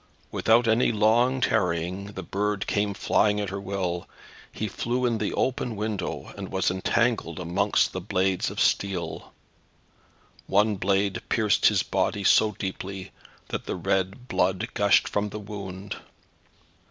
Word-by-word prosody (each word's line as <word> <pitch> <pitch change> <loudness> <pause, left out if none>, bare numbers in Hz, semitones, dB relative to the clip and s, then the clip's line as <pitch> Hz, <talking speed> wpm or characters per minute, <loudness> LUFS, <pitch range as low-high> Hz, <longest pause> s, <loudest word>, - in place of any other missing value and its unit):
Without 115 +1 +3
any 115 +2 +3
long 120 +4 +3
tarrying 90 -3 0
the - - -6
bird 105 0 -1
came 100 -1 0
flying 105 +1 +2
at 100 -2 -3
her 100 0 -4
will. 95 -3 -3 0.4
He 110 - -3
flew 120 +5 -1
in 120 - +2
at 110 - -2
the - - -1
open 125 -2 -1
window, 105 -3 -4
and 100 -1 -7
was 95 -1 +1
entangled 95 -2 0
amongst 85 0 +1
the 95 - -4
blades 95 -1 0
of - - -6
steel. 95 -3 0 1.2
One 105 +1 +3
blade 95 +1 +1
pierced 110 -3 +3
his - - +3
body 100 - -1
so 105 +2 +5
deeply, 95 0 -6 0.4
that - - -4
the - - -2
red 95 +6 -1
blood 95 +3 0
gushed 100 -1 +4
from 105 0 -1
the 105 - -6
wound. 100 -2 -7
100 Hz, 145 wpm, -26 LUFS, 95-110 Hz, 1.2 s, so